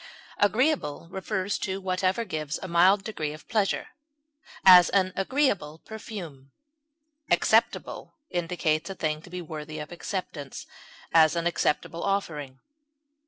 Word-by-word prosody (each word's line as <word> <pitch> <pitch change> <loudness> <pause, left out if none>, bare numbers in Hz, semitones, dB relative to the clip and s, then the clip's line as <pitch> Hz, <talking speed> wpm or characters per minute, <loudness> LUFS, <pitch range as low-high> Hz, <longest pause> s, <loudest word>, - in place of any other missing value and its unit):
Agreeable 205 - +1
refers 190 +1 -2
to 190 0 -3
whatever 190 +3 0
gives 155 -5 -3
a - - -4
mild 185 +3 +4
degree 155 -8 -4
of 155 - -13
pleasure; 215 -4 0 0.8
as, 180 -2 +9
an 185 -2 +2
agreeable 195 - 0
perfume. 180 - -8 0.8
Acceptable - - +1 0.2
indicates 170 -2 -1
a 195 - -5
thing 155 -3 -2
to 180 - -14
be 180 0 -6
worthy 155 -1 -7
of 150 +1 -7
acceptance; 170 -6 -5 0.5
as, 160 0 +6
an 170 0 -1
acceptable 165 -1 0
offering. 150 -9 -2
175 Hz, 120 wpm, -27 LUFS, 155-195 Hz, 0.8 s, as